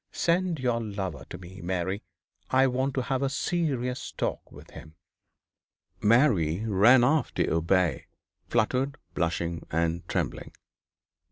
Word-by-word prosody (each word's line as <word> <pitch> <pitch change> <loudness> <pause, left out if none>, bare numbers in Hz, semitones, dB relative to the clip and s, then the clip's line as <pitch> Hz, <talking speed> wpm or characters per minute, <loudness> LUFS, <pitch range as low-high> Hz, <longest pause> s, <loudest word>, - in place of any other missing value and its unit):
Send 175 0 +1
your 120 -2 0
lover 95 - -5
to - - -7
me, 95 +1 -11
Mary. 95 +3 -2 0.5
I 130 +1 +4
want 130 +1 0
to 130 - 0
have 130 +1 -1
a 135 - +1
serious 135 -5 -2
talk - - -3
with - - -14
him.' 80 0 -12 1.1
Mary 105 - +3
ran 115 +5 +6
off 140 +2 +2
to - - +1
obey, 85 +2 +1 0.4
fluttered, 130 +6 +1 0.2
blushing, 85 0 -2
and 85 +1 0
trembling. - - -3
110 Hz, 125 wpm, -27 LUFS, 85-130 Hz, 1.1 s, ran